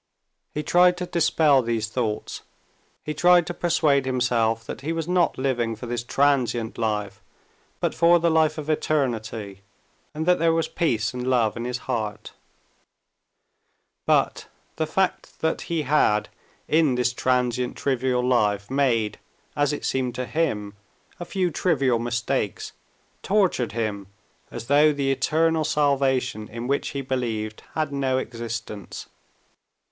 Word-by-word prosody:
He 150 - -2
tried 180 +3 +4
to 180 - -3
dispel 160 -5 +3
these 115 -2 -1
thoughts, 110 -2 -3 0.6
he 150 - -3
tried 175 +2 +5
to 175 - -4
persuade 150 -6 +1
himself 120 -3 +1
that - - -7
he 150 +4 -3
was 165 -1 -3
not 180 -1 +2
living 120 -4 -1
for 110 - -8
this 120 0 -3
transient 120 -4 +1
life, 105 -3 -2 0.6
but - - 0
for 170 +1 +5
the 170 0 +1
life 160 -1 +2
of 155 -1 -6
eternity, 115 -10 -2 0.5
and 155 +1 -2
that 180 0 +3
there 165 0 +3
was 165 - 0
peace 115 -11 0
and 125 0 -4
love 120 -4 +2
in 120 0 -4
his 125 0 -2
heart. 110 -4 -3 1.8
But - - +1 0.3
the 160 -1 -1
fact 190 +4 -1
that 160 0 0
he 165 -2 0
had 130 -8 +2 0.4
in 155 -4 +3
this 125 0 +1
transient, 125 0 0
trivial 130 -2 0
life 105 -4 +1
made, 115 -6 +1 0.4
as 145 -1 +2
it 145 - -4
seemed 130 -2 -1
to 125 - -3
him, 110 -10 -1 0.5
a 175 - -5
few 180 -1 -1
trivial 135 -7 +1
mistakes 120 -2 -2 0.5
tortured 185 - +1
him 105 -4 -3 0.4
as - - -7
though 145 +4 +5
the 140 -1 0
eternal 160 +3 +1
salvation 135 -7 +1
in 115 +2 -6
which 140 +2 0
he 140 - -4
believed 115 -5 -3
had 155 -2 -1
no 135 -2 0
existence. 115 -5 -6
130 Hz, 140 wpm, -24 LUFS, 115-155 Hz, 1.8 s, tried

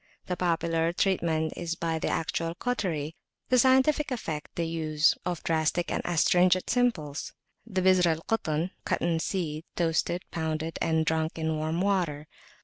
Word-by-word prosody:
The 180 - -2
popular 165 -1 +1
treatment 170 -4 +1
is 170 -1 -3
by 165 -1 -2
the - - -2
actual 165 +1 -1
cautery; 170 -11 -2 0.4
the 255 - +5
scientific 265 +4 +4
affect 165 - -5
the 170 - -1
use 155 -2 +2
of 175 -2 -3
drastics 165 +1 0
and - - -1
astringent 180 +2 +3
simples, 180 - 0 0.3
and 205 - -12
the 185 - +3
Bizr 185 -1 +5
al 160 -1 +1
Kutn 170 -5 -1
(cotton 165 -1 0
seed), 160 -4 -2
toasted, 170 +1 0
pounded, 160 0 -3
and 160 -1 +2
drunk 160 +1 0
in 160 -1 -1
warm 155 +3 -1
water. 175 -7 0
165 Hz, 150 wpm, -28 LUFS, 160-180 Hz, 0.4 s, the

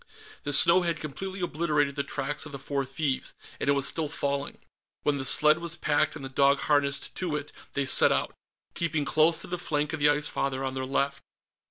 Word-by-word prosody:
The 145 - -1
snow 170 +6 +6
had 170 -3 -1
completely 190 +6 -5
obliterated 150 -4 0
the 140 - 0
tracks 140 +4 -3
of - - -11
the 140 - -6
four 140 0 -3
thieves, 135 0 -3 0.2
and - - -1
it - - +5
was 140 -1 0
still 155 -2 -2
falling. 140 -2 -3 0.5
When 145 -1 +1
the 135 - -4
sled 150 +4 +4
was 170 0 -4
packed 150 -3 +1
and 140 -4 -7
the - - -3
dog 140 +1 +3
harnessed 140 -1 +1
to 175 -5 -3
it, 145 0 -5 0.2
they 140 -1 0
set 130 - +5
out, - - 0 0.4
keeping 160 -3 -1
close 155 +3 +3
to - - -8
the 180 0 -4
flank 150 -2 -1
of 160 - -3
the 145 0 +5
Ice 145 0 +2
Father 135 -1 -2
on 130 -1 -2
their 130 0 -4
left. 140 +1 -1
145 Hz, 215 wpm, -27 LUFS, 140-155 Hz, 0.5 s, snow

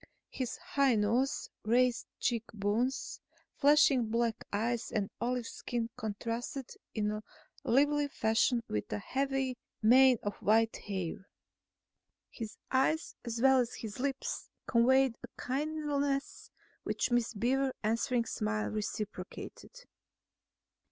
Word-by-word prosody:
His 255 -2 -3
high 280 -8 +2
nose, 230 +6 +1
raised 245 +2 +2
cheek 235 -2 0
bones, 215 +6 -1 0.3
flashing 280 -5 +5
black 230 0 0
eyes 230 +3 -1
and 205 -2 -1
olive 245 0 0
skin 235 -1 -3
contrasted 235 +4 -4 0.2
in 215 -1 -1 0.4
lively 290 +3 +3
fashion 230 -1 +2
with 105 - -3
a 105 - 0
heavy 270 - -1 0.2
mane 255 +3 +7
of 205 -1 -3
white 225 +2 +3
hair. 190 -2 -5 1.0
His 225 -3 -7
eyes 270 +5 +2
as 235 0 -3
well 265 -1 +6
as 245 -1 -1
his 220 +1 -7
lips 270 0 -2 0.2
conveyed 260 +2 +4
a - - -7
kindliness 285 0 -1 0.3
which - - -1
Miss 240 -1 +1
Beaver's 260 +5 +1
answering 230 +2 +1
smile 215 -1 -1
reciprocated. 215 - -6
240 Hz, 110 wpm, -32 LUFS, 220-270 Hz, 1.0 s, mane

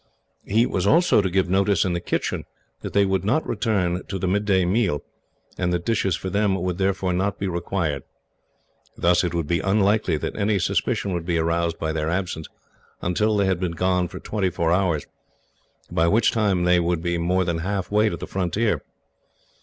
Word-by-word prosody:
He 110 +4 +3
was 95 -5 -1
also 170 - +4
to 95 - -1
give 95 +1 +1
notice, 95 +1 +2
in 90 - 0
the 85 - -1
kitchen, - - -2 0.4
that - - -6
they 100 0 +4
would 95 -1 0
not 125 +11 +1
return 100 -6 0
to 95 - -3
the 95 - -2
midday 95 -1 +2
meal, 95 -6 +1 0.6
and 90 -1 0
that 85 -1 -1
dishes 105 -6 +1
for 95 +1 -5
them 100 0 +2
would 90 -1 -2
therefore 95 -1 0
not 100 +2 -1
be 100 - -2
required. 85 -5 -2 1.0
Thus 85 +1 +3
it 85 -1 -2
would 85 -2 -1
be 85 +3 0
unlikely 100 -3 +2
that - - -4
any 100 0 +1
suspicion 95 +1 0
would 85 -1 -4
be 85 -2 +1
aroused 85 0 0
by 80 - -2
their 80 0 -1
absence 85 -3 -3 0.6
until 105 +5 +1
they 100 - +2
had 95 -2 +1
been 90 -2 -2
gone 90 +1 +1
twenty 95 +2 -2
four 85 -2 -1
hours, 85 -5 +1 0.9
by 85 - +2
which 110 +5 +3
time 100 -5 +1
they 90 0 +4
would 85 -1 0
be 85 -1 -1
more 90 +2 +1
than 85 -2 -1
halfway 100 +4 0
to 85 - -4
the - - -6
frontier. 100 +4 -1
95 Hz, 190 wpm, -23 LUFS, 85-100 Hz, 1.0 s, also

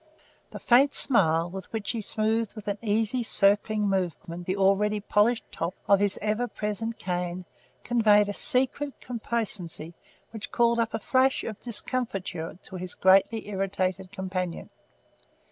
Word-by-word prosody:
The - - -8
faint 270 +4 +4
smile 165 - +3
with 190 0 -8
which 220 -2 -3
he 230 - -3
smoothed 220 +1 0
with 215 -1 -10
an 205 0 -2
easy, 225 +2 0
circling 210 -1 +2
movement, 175 -2 -3
the 185 +1 -1
already 200 +2 +2
polished 215 +3 +2
top 170 +3 -3
of 200 -1 +5
his 205 -1 +1
ever 215 +3 0
present 220 +1 -4
cane 180 0 -3 0.4
conveyed 215 -3 +4
a 205 - -3
secret 265 +5 +1
complacency 215 -9 -3 0.4
which 220 -2 -7
called 235 0 +2
up 230 -1 0
a - - -2
flash 260 +4 +2
of 215 -3 -6
discomfiture 220 -9 -3
to 190 - -8
his 180 0 -6
greatly 195 +4 +3
irritated 190 -1 -2
companion. 185 -3 -4
205 Hz, 145 wpm, -27 LUFS, 190-230 Hz, 0.4 s, of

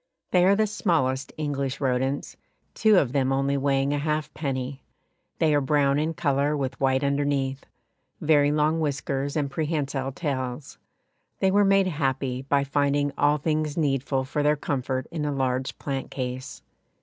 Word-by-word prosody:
They 180 -1 +4
are 195 +2 +5
the 215 +1 +2
smallest 155 -11 0
English 140 -3 -2
rodents, 130 +1 -1 0.4
two 215 -2 +4
of 140 -8 +3
them 135 -1 +1
only 135 +1 +1
weighing 140 0 +1
a 145 - 0
halfpenny; 140 -3 -3 0.6
they 155 -2 +3
are 145 - +3
brown 140 0 +2
in 160 +2 -1
colour 145 -1 +1
with 135 -1 -3
white 130 0 +2
underneath, 140 -1 -1 0.5
very 145 -2 +3
long 155 +2 +2
whiskers 140 -2 -2
and 145 -3 -1
prehensile 140 -3 -2
tails. 130 -3 -4 0.6
They 190 - +3
were 205 +1 +4
made 195 -1 +4
happy 135 -6 -1
by 140 +1 +1
finding 145 0 +1
all 145 +1 +3
things 155 0 -1
needful 135 -3 0
for 140 +3 -2
their 150 +1 +3
comfort 130 -2 -2
in 160 -3 -3
a 150 - -1
large 130 -1 -1
plant 135 -2 -4
case. 130 0 -5
140 Hz, 155 wpm, -25 LUFS, 135-150 Hz, 0.6 s, are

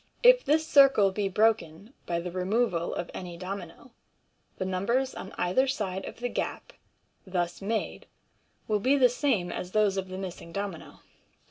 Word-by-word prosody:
If - - +7
this 315 +2 +2
circle 270 -10 +6
be 195 0 -1
broken 210 - 0
by 170 -1 0
the 175 +1 -5
removal 185 -1 0
of 175 - -4
any 175 -2 -7
domino, 190 - -7 0.7
the 185 - -2
numbers 235 +9 0
on 190 - -8
either 185 +10 +2
side 195 -7 -2
of - - -7
the 245 - 0
gap - - -4 0.5
thus 175 -1 -2
made 220 +3 -3 0.6
will 210 -1 +1
be 265 +7 +3
the 255 -2 +6
same 240 -8 0
as 180 - -6
those 210 -2 +2
of 190 -1 -2
the 185 0 -7
missing 180 -3 -7
domino. 195 -2 -6
195 Hz, 160 wpm, -28 LUFS, 180-245 Hz, 0.7 s, If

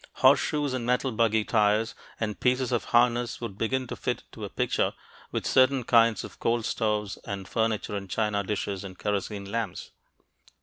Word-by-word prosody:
Horseshoes 145 -3 +3
and 130 -2 -2
metal 125 +2 +1
buggy 110 -1 +2
tires 105 0 +2 0.3
and 105 -5 -2
pieces 125 0 +1
of 120 - 0
harness 120 0 +2
would 115 -5 -5
begin 130 +5 -1
to - - -6
fit - - -3
into - - -11
a - - -4
picture - - 0 0.4
with - - -2
certain 130 0 +4
kinds 115 -1 +4
of - - -10
coal 115 0 +1
stoves 105 -2 -1
and 100 -3 -6
furniture 110 -2 -1
and 100 -1 -5
china 105 -1 0
dishes 100 -1 -3
and 95 -2 -9
kerosene 100 -1 -3
lamps. 115 -4 -3
110 Hz, 170 wpm, -27 LUFS, 105-120 Hz, 0.4 s, certain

